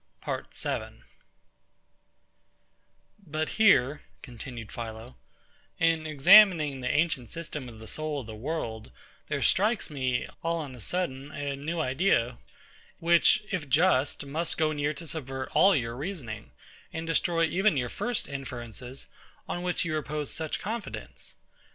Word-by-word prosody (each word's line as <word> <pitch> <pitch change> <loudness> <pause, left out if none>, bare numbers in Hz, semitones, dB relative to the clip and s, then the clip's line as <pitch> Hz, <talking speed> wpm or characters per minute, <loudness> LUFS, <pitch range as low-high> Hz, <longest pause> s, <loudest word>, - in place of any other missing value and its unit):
PART - - -5
7 - - -3 2.2
But 155 -2 -2
here, 150 - +4 0.2
continued 120 -2 -8
PHILO, 115 +1 -7 0.6
in 165 -1 +2
examining 155 -2 +7
the 125 - -1
ancient 145 -6 +1
system 150 -5 -5
of 115 - -12
the 110 - -10
soul 150 +6 -3
of - - -10
the 110 - -8
world, 110 -3 -4 0.4
there - - -1
strikes 210 -2 +2
me, 130 -3 -1
all 165 0 0
on 145 -5 -5
a 125 - -11
sudden, 140 - -3
a 145 -1 -3
new 160 +5 -3
idea, 130 -4 +2 0.6
which, 170 +5 +4
if 165 -8 -2
just, 145 -2 +3
must 160 +5 -2
go 155 -1 +2
near 150 0 -1
to 165 - -8
subvert 135 -4 -4
all 195 0 +6
your 115 -4 -1
reasoning, 130 - -5 0.4
and 160 0 -4
destroy 165 +1 +2
even 185 0 +2
your 125 -2 0
first 240 - -2
inferences, 125 -2 -6 0.4
on 175 - -3
which 180 0 0
you 165 - -1
repose 150 -1 -2
such 160 -2 -3
confidence. 220 +2 -5
150 Hz, 140 wpm, -28 LUFS, 130-165 Hz, 2.2 s, examining